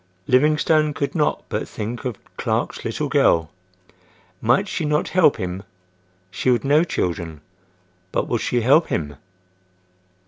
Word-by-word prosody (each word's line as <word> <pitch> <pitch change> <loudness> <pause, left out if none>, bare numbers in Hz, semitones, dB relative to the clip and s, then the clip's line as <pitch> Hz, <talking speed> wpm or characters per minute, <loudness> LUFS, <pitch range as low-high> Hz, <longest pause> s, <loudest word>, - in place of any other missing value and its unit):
Livingstone 150 +3 +3
could 140 - -2
not 150 -3 0
but - - -3
think 115 +5 -5
of 120 -5 -3 0.2
Clark's - - -2
little - - -2
girl. 80 -3 +2 0.9
Might 125 - +2
she 175 - -3
not 150 0 0
help 180 -6 +4
him? 90 +1 -4 0.7
She 100 +6 -1
would 120 -2 +2
know 150 +4 +4
children. 85 - -3 0.7
But - - -1
would - - -1
she 120 - 0
help 140 +8 +4
him? 75 -3 -3
125 Hz, 135 wpm, -22 LUFS, 95-150 Hz, 0.9 s, help